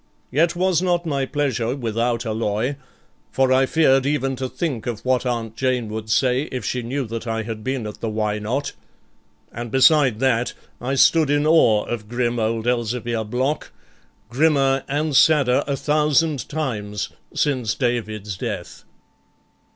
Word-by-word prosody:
Yet 165 +6 +2
was 180 -1 +2
not 175 -1 +1
my 140 -4 -1
pleasure 130 -5 -1
without 115 -1 -1
alloy, 110 +4 -1 0.5
for 130 -1 +2
I 130 0 +3
feared 135 -4 +3
even 135 -2 0
to 130 0 -3
think 135 -10 -3
of 115 -1 -4
what 130 0 +1
Aunt 115 -2 -3
Jane 125 -3 -1
would 110 0 -6
say 125 +5 +1
if 125 - -4
she 125 - -1
knew 130 +3 -3
that 115 +1 -6
I 115 0 -2
had 110 -1 -6
been 130 -2 -2
at 105 - -7
the 115 - -3
Why 105 -1 -1
Not? 125 +7 -2 0.8
and 120 +1 -6
beside 130 -1 +4
that, 125 -2 +1 0.3
I 130 +3 -1
stood 155 +2 +4
in 145 +1 +2
awe 135 -10 +4
of 110 -3 -5
grim 120 0 -1
old 110 0 -1
Elzevir 120 -1 -1
Block, 130 +6 -1 0.6
grimmer 135 +1 +2
and 145 +1 -1
sadder 140 -4 +4
a 140 -1 -1
thousand 150 -2 +1
times 105 -9 -3 0.3
since 130 -7 0
David's 110 -5 -2
death. - - -6
125 Hz, 155 wpm, -22 LUFS, 115-140 Hz, 0.8 s, beside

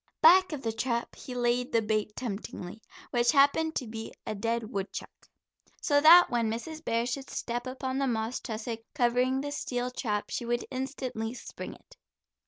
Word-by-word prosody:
Back 370 +3 +7
of 290 -3 -5
the 225 - 0
trap 235 +1 -2
he 250 - -8
laid 245 +2 +1
the 230 - +3
bait 215 0 -1
temptingly, 205 -3 -6 0.3
which 240 -1 +3
happened 310 +3 +4
to 260 - -1
be 225 0 -6
a - - -2
dead 230 +2 -2
woodchuck. 195 -3 -6 0.5
So 285 -2 +3
that 340 +4 +9
when 235 -2 +1
Mrs. 310 +8 -5
Bear 230 -4 +1
should 265 +2 -4
step 240 +1 -3
upon 260 +1 -3
the 275 - +1
moss 225 0 -1
tussock 225 0 -4 0.2
covering 250 0 +2
the 285 +1 -4
steel 250 -3 -2
trap, 210 -4 -2
she - - -2
would 240 0 -1
instantly 255 -3 -3
spring - - -8
it. - - -20
245 Hz, 175 wpm, -29 LUFS, 225-270 Hz, 0.5 s, that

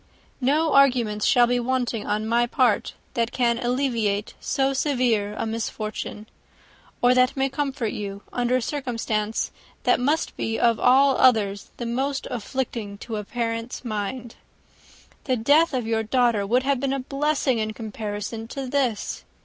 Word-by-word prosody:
No 300 +4 +2
arguments 245 -6 +3
shall 245 -1 +6
be 245 +1 +1
wanting 245 -3 -1
on 210 +1 0
my 235 +2 +2
part, 240 -3 +1 0.2
that 230 0 0
can 235 -2 +1
alleviate 240 -5 0
so 270 0 0
severe 245 -7 +1
a - - -1
misfortune; 215 -1 -4 0.8
or 245 +1 +6
that 255 +1 +3
may 270 0 +1
comfort 270 -5 -2
you, 200 -1 -6
under 245 0 +1
a 255 - +1
circumstance 230 -6 -2 0.3
that - - +3
must 295 +6 0
be, 225 0 -2
of 230 -2 +3
all 270 +2 +5
others, 205 -5 +3
most 265 +4 -2
afflicting 230 -3 -4
to 220 +1 -5
a 210 - -3
parent's 230 +2 -4
mind. 225 +2 -4 0.9
The 255 -2 +1
death 290 +9 +4
of 255 -4 -1
your 225 0 0
daughter 225 -3 +1
would 250 +4 +2
have 275 -1 +1
been 270 +1 0
a 275 - -1
blessing 275 -2 0
in 215 0 -1
comparison 215 0 -5
of 265 -2 -4
this. 255 -7 -1
240 Hz, 150 wpm, -24 LUFS, 220-265 Hz, 0.9 s, shall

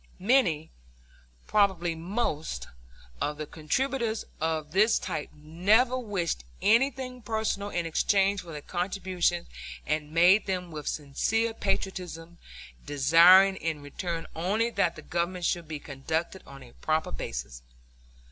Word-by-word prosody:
Many, 185 - +2 0.7
probably 190 -5 +2
most, 160 - -3 0.5
of 150 0 -1
the 155 - -4
contributors 225 - -2
of 155 -1 -2
this 215 +6 +4
type 150 - -4
never 185 +12 +2
wished 200 - -2 0.2
anything 255 +2 +1
personal 220 -2 -2
in 175 -3 -2
exchange 195 +4 +2
for 170 - -11
their 150 -2 -7
contributions, 180 -1 -1 0.4
and 150 -1 -1
made 180 +6 +5
them 180 -2 -2
with 150 -2 -7
sincere 225 +11 0
patriotism, 175 -5 -3 0.4
desiring 170 +7 +6
in 160 -4 -3
return 165 +3 -4
only 210 +8 0
that 180 -6 +1
the 155 - -11
Government 175 +1 -2
should 170 -2 -1
be 155 -1 -4
conducted 160 +6 -4
on 135 -1 -11
a 120 - -16
proper 155 0 0
basis. - - -6
175 Hz, 125 wpm, -28 LUFS, 155-200 Hz, 0.7 s, desiring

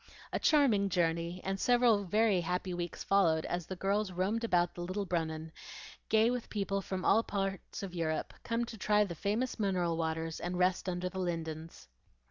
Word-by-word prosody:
A - - +1
charming 235 -10 +4
journey, 170 0 0
and 195 0 -2
several 240 -4 +4
very 210 0 +3
happy 180 +2 -2
weeks 175 -1 -4
followed 165 -5 +3
as 175 -2 -3
the 190 - -4
girls 200 +2 0
roamed 195 +6 -1
about 175 -6 +2
the 175 - -7
Little 185 +3 -2
Brunnen, 160 -2 -2 0.6
gay 220 +2 +4
with 250 -2 -3
people 195 -1 -1
from 190 -1 -4
all 220 - +5
parts 195 -3 -3
of 190 -2 -5
Europe, 160 -2 -2
come 230 +1 -1
to 225 -2 -9
try 210 +1 +3
the 190 -4 -4
famous 210 +9 -1
mineral 180 -5 +1
waters, 160 0 -2
and 180 0 -3
rest 185 +1 +1
under 180 0 -2
the 190 +1 -5
lindens. 165 -2 -4
185 Hz, 180 wpm, -32 LUFS, 170-210 Hz, 0.6 s, all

